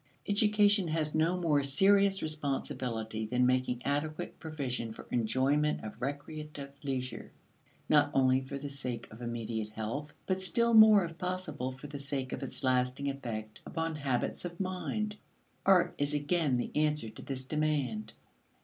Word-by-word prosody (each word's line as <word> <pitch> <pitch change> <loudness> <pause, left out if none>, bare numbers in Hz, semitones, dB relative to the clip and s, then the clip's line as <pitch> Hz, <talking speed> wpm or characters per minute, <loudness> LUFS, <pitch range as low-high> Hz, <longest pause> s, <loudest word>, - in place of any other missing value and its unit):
Education 205 -2 +4
has 155 -1 0
no 165 +3 +2
more 160 -5 +2
serious 195 +7 +4
responsibility 130 -7 -2
than 125 +2 +2
making 125 -1 +1
adequate 145 +2 -2
provision 135 -7 -3
for - - -10
enjoyment 135 +6 +1
of 110 +2 -8
recreative 145 +1 -5
leisure; 130 -4 -4 0.6
not - - +5
only 130 -1 +3
for 135 +1 -6
the 145 +1 -5
sake 125 -4 -4
of 110 +3 -11
immediate 115 -2 -3
health, 115 +8 -4
but 190 0 0
still 235 +5 +3
more 215 -3 +8
if 165 0 -9
possible 180 -8 -3
for 135 +3 -11
the 145 -1 -6
sake 140 -2 -3
of - - -4
its 135 - -3
lasting 130 +2 +1
effect 110 -5 -6
upon 165 0 -3
habits 135 -4 -1
of 175 -1 -6
mind. 205 +3 -2 0.5
Art 190 -2 +5
is 145 +1 0
again 145 -2 +1
the 120 - -2
answer 150 -6 +1
to - - -10
this 130 -1 -4
demand. 135 -8 -1
145 Hz, 150 wpm, -31 LUFS, 125-165 Hz, 0.6 s, more